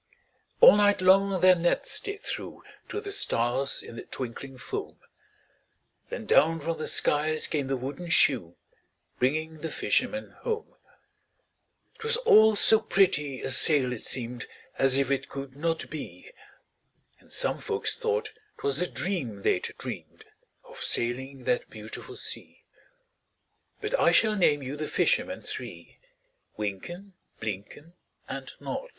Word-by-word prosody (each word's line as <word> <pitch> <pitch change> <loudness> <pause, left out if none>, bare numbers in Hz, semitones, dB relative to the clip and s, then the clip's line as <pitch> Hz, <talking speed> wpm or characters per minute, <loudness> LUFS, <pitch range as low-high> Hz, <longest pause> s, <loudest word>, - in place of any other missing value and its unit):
All - - +10
night 205 0 +4
long 190 0 +4
their 185 0 +8
nets 175 -1 0
they 405 0 -5
threw 465 - -6 0.3
To 425 - -3
the 410 -1 -6
stars 130 - 0
in 115 - -10
the - - -5
twinkling 130 +1 -7
foam,— - - -5 1.1
Then - - -5
down 165 +2 +4
from 165 +2 -3
the 155 - -3
skies 155 +1 +1
came 145 -4 -1
the 135 0 0
wooden 145 +8 -5
shoe, 115 - +3 0.6
Bringing 155 +5 0
the 160 - -4
fishermen 260 +10 0
home: 450 -2 -3 1.3
'Twas 455 0 +3
all 220 - +6
so 220 +1 +5
pretty 175 -10 +1
a - - -2
sail, 130 -2 +3
it 115 - -7
seemed 120 -1 -3 0.3
As 135 0 +3
if 140 -1 +1
it 135 - -1
could 135 -1 -7
not 165 +2 -1
be; 155 - -8 0.9
And - - -22
some - - -1
folk 425 -2 -3
thought 455 -2 0 0.3
'twas 140 +3 0
a 180 - +1
dream 130 - -3
they'd 90 - +1
dreamed - - -8 0.4
Of - - -12
sailing 130 +3 -2
that 125 - 0
beautiful 110 0 -9
sea; - - -6 1.2
But - - -3
I - - +5
shall 215 -1 +4
name 150 -7 +3
you 135 +3 -5
the 155 0 -3
fishermen - - +1
three: - - -8 0.6
Wynken, 175 - -5 0.3
Blynken, 110 - -6 0.3
And - - -6
Nod. - - -5
155 Hz, 140 wpm, -28 LUFS, 130-200 Hz, 1.3 s, All